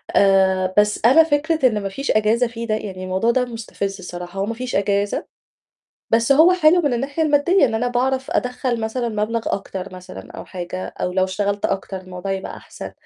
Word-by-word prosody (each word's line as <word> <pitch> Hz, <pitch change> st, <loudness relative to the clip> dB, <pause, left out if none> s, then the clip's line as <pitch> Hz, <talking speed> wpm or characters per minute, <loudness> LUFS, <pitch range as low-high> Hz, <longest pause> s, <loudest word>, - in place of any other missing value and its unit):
آآ، 190 Hz, -1 st, +3 dB
بس 210 Hz, 0 st, +3 dB
أنا 295 Hz, +7 st, +7 dB
فكرة 310 Hz, -2 st, +2 dB
إن 210 Hz, -3 st, -1 dB
ما 195 Hz, -, -2 dB
فيش 275 Hz, +8 st, -2 dB
أجازة 220 Hz, +3 st, +2 dB
فيه 230 Hz, 0 st, -6 dB
ده، 215 Hz, -, +1 dB
يعني 190 Hz, -3 st, -6 dB
الموضوع 190 Hz, +5 st, +1 dB
ده 250 Hz, 0 st, +1 dB
مُستفز 215 Hz, -4 st, -5 dB
الصراحة 180 Hz, +1 st, -7 dB
هو 195 Hz, -, 0 dB
ما 230 Hz, -, -3 dB
فيش 250 Hz, +2 st, -5 dB
أجازة، 200 Hz, 0 st, 0 dB, 0.9 s
بس 230 Hz, +3 st, +3 dB
هو 325 Hz, +6 st, +6 dB
حلو 350 Hz, 0 st, +4 dB
من 285 Hz, -5 st, +1 dB
الناحية 280 Hz, +6 st, -1 dB
المادّية 295 Hz, +3 st, +3 dB
إن 230 Hz, -, -1 dB
أنا 245 Hz, +2 st, 0 dB
باعرف 260 Hz, +3 st, -1 dB
أدخّل 250 Hz, -1 st, -1 dB
مثلًا 235 Hz, +2 st, -2 dB
مَبلغ 215 Hz, +2 st, -1 dB
أكتر 195 Hz, -1 st, -4 dB
مثلًا 185 Hz, 0 st, -10 dB
أو -, -, -9 dB
حاجة، 185 Hz, 0 st, -6 dB
أو 180 Hz, -, -4 dB
لو 185 Hz, +1 st, +1 dB
اشتغلت 200 Hz, +2 st, -1 dB
أكتر 195 Hz, 0 st, -3 dB
الموضوع 185 Hz, +1 st, -6 dB
هيبقى 190 Hz, 0 st, -5 dB
أحسن. -, -, -9 dB
220 Hz, 195 wpm, -21 LUFS, 195-255 Hz, 0.9 s, أنا